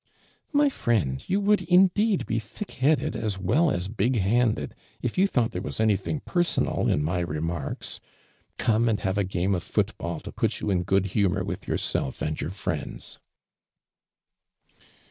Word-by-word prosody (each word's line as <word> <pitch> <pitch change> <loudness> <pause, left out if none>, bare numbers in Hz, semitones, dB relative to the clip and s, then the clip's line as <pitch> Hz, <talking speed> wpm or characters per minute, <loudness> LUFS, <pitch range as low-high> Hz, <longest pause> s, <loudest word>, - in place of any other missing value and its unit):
" - - -38
My 290 -1 +4
frien<l, 95 - 0
you 195 - +2
would 205 +1 +3
indeed 190 +3 +3
be 115 - 0
thick 115 - -8
headed 145 +4 +1
as 105 -4 -2
well 145 - +2
as 90 -8 -1
big 115 +4 0
handed 105 - +1 0.3
if 120 - -3
you 190 +2 +4
thought 120 -10 +1
there - - -4
was - - -5
anything 110 - +1
personal 175 -2 0
'n\ 75 - +2
my 85 +4 0
remarks. 80 -2 -3 0.6
Come 115 0 +2
and 110 - +1
have 95 +1 0
a - - +3
game 95 +1 0
of 90 - 0
foot" 100 +2 -1
bill 85 -1 -3
to - - -8
put - - -1
you 105 - -1
in 90 -2 +2
good 95 +1 +1
lumior 100 -4 +2
with - - -5
yourself 65 - -1
and 75 0 -2
your 70 - -2
friends 90 -5 -5
105 Hz, 170 wpm, -26 LUFS, 90-130 Hz, 0.6 s, My